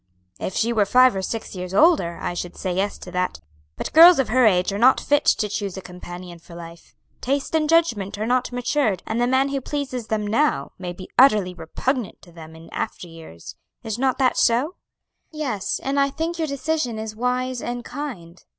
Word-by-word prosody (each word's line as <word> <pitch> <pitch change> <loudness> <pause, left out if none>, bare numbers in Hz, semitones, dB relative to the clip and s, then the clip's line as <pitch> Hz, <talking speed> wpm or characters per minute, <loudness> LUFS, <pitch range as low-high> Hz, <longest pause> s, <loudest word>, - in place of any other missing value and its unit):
"If 185 - -4
she 235 +2 +1
were 210 -3 +2
five 255 +1 +5
or 190 - -2
six 220 +4 -5
years 180 0 -6
older, 300 - +4
I - - -3
should 175 0 -6
say 185 -2 -3
yes 195 +3 -1
to 180 - -10
that; 180 - -2 0.4
but - - -5
girls 340 +2 +9
of 270 - 0
her 250 0 +4
age 185 -1 +2
are 200 - -3
not 255 +3 +5
fit 290 0 +1
to 210 - +2
choose 205 -2 -4
a - - -5
companion 180 -1 -10
for 170 +1 -14
life; 170 0 -12 0.3
taste 275 +4 -2
and 310 -1 +1
judgment 230 - +1
are 215 - -2
not 250 +2 0
matured, 245 - 0
and 225 +2 -2
the 245 - +2
man 260 +2 +2
who 275 -1 -2
pleases 260 -4 -4
them 215 -1 -1
now 260 +9 0
may 180 -1 -5
be 185 +1 -11
utterly 210 -9 +5
repugnant 195 - -3
to 175 - -16
them 160 -1 -12
in 160 +1 -13
after 180 - -4
years. 160 - -12 0.3
Is 220 +1 -4
not 260 -1 +1
that 260 -2 +2
so?" 255 +8 +2 0.6
"Yes; 275 -11 -3
and 275 +1 0
I 280 0 +3
think 330 +4 -4
your 320 - 0
decision 280 -4 -2
is 220 0 -6
wise 250 +1 -1
and 240 0 -5
kind. 185 - -7
225 Hz, 205 wpm, -22 LUFS, 185-270 Hz, 0.6 s, girls